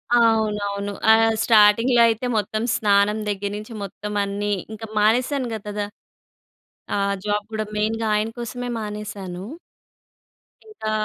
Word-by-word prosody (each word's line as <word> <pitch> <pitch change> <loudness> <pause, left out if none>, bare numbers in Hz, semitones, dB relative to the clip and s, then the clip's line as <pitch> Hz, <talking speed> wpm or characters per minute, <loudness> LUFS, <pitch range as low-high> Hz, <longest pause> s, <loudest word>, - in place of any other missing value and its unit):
అవునవును. 210 -3 +1 0.2
ఆహ్, 225 0 +5
స్టార్టింగ్‌లో 230 +3 +5
అయితే, 225 +2 0
మొత్తం 215 +2 -1
స్నానం 205 0 +3
దెగ్గిర 200 0 -2
నించి 215 +2 -8
మొత్తమన్నీ. 205 +1 -2 0.2
ఇంక 220 - -9
మానేసానుగ 240 +3 +1
కదా! 205 0 -2 1.1
ఆహ్, 200 0 +1
జాబ్ 205 0 0
కూడా 215 0 -2
మెయిన్‌గా 220 +1 0
ఆయన 210 +1 0
కోసమే 245 +1 -5
మానేశాను. 210 -4 -6 1.3
ఇంకా, 295 - -4
210 Hz, 110 wpm, -22 LUFS, 205-225 Hz, 1.3 s, ఆహ్